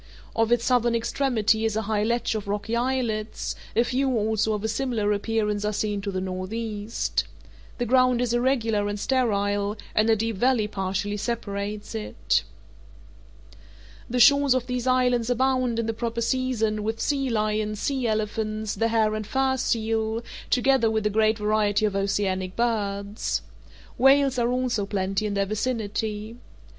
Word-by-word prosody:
Off 225 0 +1
its 240 -1 +3
southern 240 -2 +2
extremity 230 -2 +1
is 220 -1 0
a 220 - 0
high 210 0 0
ledge 235 +1 0
of 215 -2 -4
rocky 205 +3 -2
islets; 235 -3 -1 0.2
a 230 - +4
few 260 +2 0
also 220 0 +1
of 210 -1 -3
a - - 0
similar 220 -2 0
appearance 210 0 0
are 210 - 0
seen 210 -1 -2
to 200 - -4
the 190 -1 -2
northeast. 205 +4 -3 0.5
The 245 - -1
ground 255 0 +4
is 245 -1 0
irregular 235 -4 +1
and 205 0 -3
sterile, 205 -4 0 0.2
and 215 +1 +3
a 225 - +5
deep 225 -1 -2
valley 245 -1 +2
partially 195 +1 -2
separates 205 -2 -4
it. 220 -1 0 1.7
The 250 +1 0
shores 280 +1 +6
of 255 -1 0
these 250 0 -3
islands 250 -2 +2
abound, 255 -1 +1
in 230 - 0
the 225 - -1
proper 235 +1 -3
season, 230 -3 0
with 220 +2 -2
sea 275 -2 0
lions, 215 -1 -1
sea 265 -1 -1
elephants, 215 0 -2
the 225 - +1
hair 220 -2 +2
and 215 -1 -4
fur 265 0 +1
seal, 225 -2 -1 0.3
together 255 -2 +3
with 220 -1 -1
a 210 - +2
great 220 +1 +3
variety 210 0 +1
of 205 -2 -1
oceanic 190 -2 -1
birds. 205 -3 -1 0.6
Whales 270 0 +5
are 240 0 +2
also 250 -5 0
plenty 195 +1 -1
in 205 - -3
their 200 0 +1
vicinity. 215 0 -3
220 Hz, 160 wpm, -25 LUFS, 210-240 Hz, 1.7 s, shores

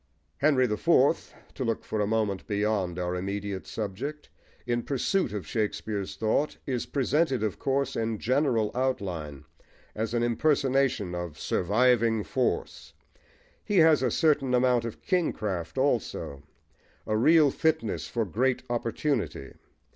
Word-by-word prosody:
Henry 140 -3 +3
the 105 -3 -1
Fourth - - +2 0.2
to - - -4
look 115 - -1
for 110 - -2
a 105 - +1
moment 105 -3 -1
beyond 100 -4 0
our 90 0 -2
immediate 100 +1 -4
subject, 115 +9 -5 0.4
in 120 0 0
pursuit 145 +10 0
of 105 -2 -4
Shakespeare's 105 -2 -3
thought 115 +7 0
is 125 -3 -2
presented, 140 -2 +1
of 105 -3 -2
course, 135 0 0
in 115 -1 -1
general 125 -3 +1
outline, 90 - -3 0.5
as 110 +2 -2
an 120 - +1
impersonation 130 - +1
of 85 -3 -5
"surviving 115 +2 +2
force:" 130 +3 -2 0.7
he 205 - 0
has 160 -4 +6
a 130 - +2
certain 140 -2 +2
amount 125 -1 +3
of 115 - -7
kingcraft 105 - -1
also, 120 - -1 0.6
a 110 - -1
real 150 +5 +5
fitness 150 -10 0
for 115 -2 -1
great 125 +7 0
opportunity. 120 - -2
115 Hz, 130 wpm, -27 LUFS, 105-135 Hz, 0.7 s, has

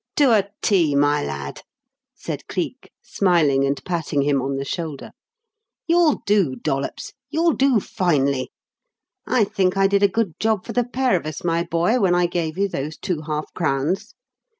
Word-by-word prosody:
"To 285 -5 +4
a 200 -3 +3
T, 170 -8 +3
my 145 +1 +2
lad," 70 -1 -5 0.5
said - - -6
Cleek, - - -4
smiling 160 -8 +2
and 140 +1 0
patting 160 -5 -1
him 140 -1 +1
on 135 +1 -2
the 135 0 -3
shoulder. 155 -2 -5 0.7
"You'll 335 -3 +3
do, 195 -10 +2
Dollops 135 +1 -3 0.2
you'll 325 +3 +2
do 270 -4 +3
finely. 140 - 0 0.8
I 245 - +3
think 190 -1 0
I 195 - +4
did 200 0 +3
a 200 - +6
good 200 -4 -2
job 220 -3 0
for - - -6
the 245 -1 +1
pair 250 -2 +1
of 165 - -2
us, 155 - -6
my 170 -1 +1
boy, 175 +8 +1
when 185 -5 +3
I 175 0 +3
gave 170 -2 -2
you 200 +1 +2
those 150 -3 -5
two 170 -5 -3
half 155 0 -4
crowns." 165 - -1
175 Hz, 175 wpm, -22 LUFS, 145-205 Hz, 0.8 s, a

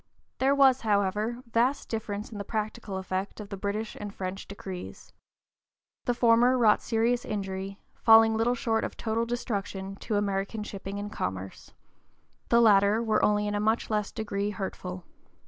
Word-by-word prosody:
There 270 +2 +3
was, 270 -2 +5
however, 210 +3 0
vast 240 +4 +1
difference 215 -2 -4
in 210 - -7
the - - -3
practical 210 -2 -4
effect 190 +2 -4
of 205 -1 -8
the - - -4
British 205 +3 -3
and 205 -1 -6
French 190 0 -5
decrees. 190 -2 -8 0.9
The 245 - +1
former 240 +2 +4
wrought 220 -4 +4
serious 235 +1 +1
injury, 195 -1 -4
falling 225 0 +6
little 235 +2 +2
short 225 -2 0
of - - -5
total 230 +1 -1
destruction, 200 -5 -3
to 215 - -3
American 200 +1 -1
shipping 200 -1 -6
and 205 +1 -5
commerce; 95 - -5 0.7
the 235 - +5
latter 210 0 +5
were 220 -2 +1
only 210 0 +3
in 205 - -1
a 205 - 0
much 220 +2 0
less 210 -1 0
degree 205 -2 -2
hurtful. 185 -2 -5
210 Hz, 160 wpm, -28 LUFS, 195-230 Hz, 0.9 s, falling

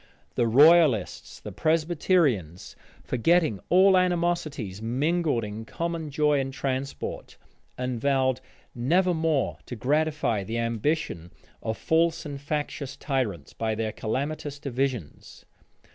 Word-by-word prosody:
The 120 - +1
royalists, 145 - +4
the - - -8
Presbyterians, 155 - 0 0.3
forgetting 155 - +2
all 190 +2 +6
animosities, 170 - 0
mingled 145 +3 0
in 105 +1 -6
common 165 +5 -4
joy 150 0 +2
and 135 0 -2
transport, 135 0 -4 0.4
and 125 -2 -3
vowed 130 -2 +1 0.3
never 175 +10 +2
more 160 -4 0
to 125 - -5
gratify 150 -4 0
the 115 +4 -4
ambition 115 - -2 0.3
of 110 0 -3
false 165 0 +1
and 140 -2 -6
factious 145 -2 -4
tyrants 120 - -2
by 110 -1 -2
their 110 0 -2
calamitous 140 +6 -3
divisions. 130 - -4
140 Hz, 115 wpm, -26 LUFS, 115-160 Hz, 0.4 s, all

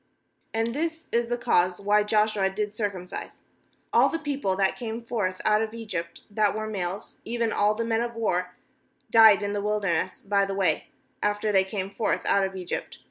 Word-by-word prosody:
4And 225 +1 0
this 320 +2 -3
is 235 0 +1
the 240 0 -1
cause 180 -5 +2
why 205 +1 +3
Joshua 210 -2 +2
did 205 +1 -3
circumcise: 200 -4 -5 0.5
all - - +6
the 330 - -1
people 285 -11 -1
that 195 0 +1
came 230 -1 -5
forth 205 -6 -2
out 215 0 +4
of 220 0 -3
Egypt, 170 -7 -5
that 210 0 +2
were^ 215 0 -3
males, 190 -1 -4
even 230 -1 -1
all 210 +1 +3
the 230 +1 -2
men 225 0 +1
of 235 0 -3
war, 180 -5 -1 0.6
died 220 -3 +7
in 205 0 -2
the 205 - -1
wilderness 200 -4 -1
by 200 0 +2
the 195 0 -2
way, 195 -2 +1 0.3
after 210 +1 0
they 190 -2 +4
came 190 0 -4
forth 215 - -1
out 200 - +3
of 190 0 -2
Egypt. 180 -2 -5
210 Hz, 190 wpm, -26 LUFS, 195-225 Hz, 0.6 s, died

